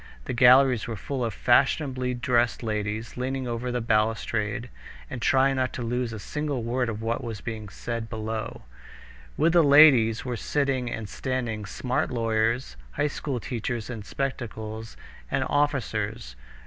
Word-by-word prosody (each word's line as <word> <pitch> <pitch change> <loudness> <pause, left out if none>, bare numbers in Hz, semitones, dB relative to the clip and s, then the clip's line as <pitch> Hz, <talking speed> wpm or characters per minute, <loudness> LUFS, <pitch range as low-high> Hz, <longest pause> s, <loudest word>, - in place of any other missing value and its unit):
The - - -3
galleries 125 0 +6
were 115 - -3
full 130 +5 -3
of 115 - -1
fashionably 130 +1 +2
dressed 120 -1 +1
ladies, 105 +1 -3
leaning 130 +1 -2
over 120 +1 -3
the 125 0 -1
balustrade 115 +1 0 0.4
and 130 - -5
trying 135 +2 +3
not 130 0 0
to 125 - -4
lose 120 0 -1
a 110 - -5
single 145 +2 -3
word 120 +1 0
of 110 0 -5
what 115 +3 -1
was 115 -3 -5
being 110 -2 -6
said 115 +2 -5
below. 110 0 -4 0.7
With 165 +2 +3
the 175 - +7
ladies 140 -7 +6
were 125 -1 -2
sitting 135 -2 0
and 110 -2 -5
standing 115 -3 -3
smart 125 +5 -1
lawyers, 115 - 0 0.2
high - - 0
school 140 -3 -3
teachers 120 0 -4
in 115 -3 -5
spectacles, 110 -3 -5 0.3
and - - 0
officers. 115 - -1
120 Hz, 150 wpm, -26 LUFS, 110-130 Hz, 0.7 s, the